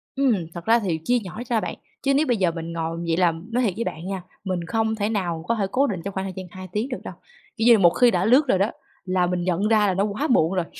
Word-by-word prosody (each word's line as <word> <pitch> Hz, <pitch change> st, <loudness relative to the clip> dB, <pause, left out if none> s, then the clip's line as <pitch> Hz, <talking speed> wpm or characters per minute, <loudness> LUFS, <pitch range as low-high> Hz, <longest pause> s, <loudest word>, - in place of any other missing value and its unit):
Ừm, 270 Hz, -3 st, +3 dB, 0.2 s
thật 170 Hz, -1 st, -8 dB
ra 230 Hz, +1 st, +5 dB
thì 180 Hz, -7 st, -2 dB
chia 245 Hz, -, +3 dB
nhỏ 195 Hz, +5 st, -7 dB
ra 235 Hz, -2 st, +2 dB
bạn. -, -, -4 dB, 0.3 s
Chứ 275 Hz, -, +2 dB
nếu 290 Hz, +3 st, +3 dB
bây 245 Hz, -, +2 dB
giờ 185 Hz, -4 st, +2 dB
mình 165 Hz, 0 st, -6 dB
ngồi 165 Hz, 0 st, -3 dB
vậy 165 Hz, 0 st, +1 dB
là 175 Hz, -2 st, +4 dB, 0.2 s
nói 250 Hz, +2 st, +1 dB
thiệt 205 Hz, -6 st, +1 dB
với 230 Hz, -, -2 dB
bạn 165 Hz, -4 st, -5 dB
nha, 195 Hz, -1 st, -3 dB, 0.2 s
mình 185 Hz, -3 st, -2 dB
không 220 Hz, 0 st, 0 dB
thể 210 Hz, -1 st, -1 dB
nào 175 Hz, -7 st, -2 dB
có 230 Hz, -, +2 dB
thể 205 Hz, -3 st, 0 dB
cố 275 Hz, +5 st, +2 dB
định 190 Hz, -8 st, -3 dB
trong 200 Hz, -, -4 dB
khoảng 190 Hz, 0 st, -3 dB
thời 190 Hz, -, -5 dB
gian 190 Hz, -, -6 dB
2 185 Hz, 0 st, -9 dB
tiếng 215 Hz, +7 st, -2 dB
được 250 Hz, -, -3 dB
đâu, -, -, -7 dB, 0.4 s
kiểu 225 Hz, -, 0 dB
như, 235 Hz, -2 st, +8 dB
một 175 Hz, -3 st, +7 dB
khi 245 Hz, +7 st, +4 dB
đã 180 Hz, -1 st, +1 dB
lướt 260 Hz, +6 st, +5 dB
rồi 195 Hz, -, +3 dB
đó, 200 Hz, +4 st, +1 dB, 0.3 s
là 185 Hz, -1 st, +1 dB
mình 180 Hz, 0 st, -1 dB
nhận 185 Hz, +3 st, 0 dB
ra 215 Hz, -2 st, +4 dB
là 190 Hz, -, +1 dB
nó 190 Hz, +2 st, +1 dB
quá 215 Hz, +9 st, -1 dB
muộn 165 Hz, -7 st, +3 dB
rồi, 180 Hz, -3 st, 0 dB
195 Hz, 300 wpm, -23 LUFS, 180-230 Hz, 0.4 s, như